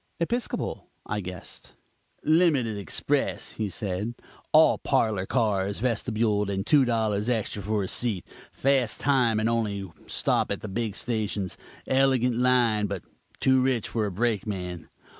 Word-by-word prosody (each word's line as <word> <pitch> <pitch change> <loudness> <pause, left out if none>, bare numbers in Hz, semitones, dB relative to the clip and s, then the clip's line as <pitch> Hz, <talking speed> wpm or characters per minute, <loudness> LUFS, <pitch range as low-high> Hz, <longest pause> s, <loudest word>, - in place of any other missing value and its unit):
"Episcopal?" 235 +8 -2 0.2
I 105 - -2
guessed. 90 -1 -9 0.5
"Limited 150 -9 +3
express!" 100 -5 -1
he 110 -2 -3
said, 100 +4 -3 0.4
"all - - +6
parlor 105 -4 +1
cars, 100 -5 0
vestibuled, 110 -3 0
and 95 0 -2
two 140 +1 +5
dollars 110 -2 0
extra 110 -3 -1
for 105 +1 -1
a - - -3
seat; 110 -6 +1 0.3
fast 135 -4 +1
time, 125 -6 +2
and 110 - +1
only 105 -5 -1 0.2
stop - - +1
at - - -2
the - - -6
big 110 0 -2
stations. 105 -5 -2 0.3
Elegant 130 -2 +3
line, 120 -4 +3
but 100 -3 -5 0.4
too 130 -1 +4
rich 130 -3 0
for 110 -2 -1
a - - -4
brakeman. 95 -5 -2
110 Hz, 140 wpm, -26 LUFS, 100-125 Hz, 0.5 s, all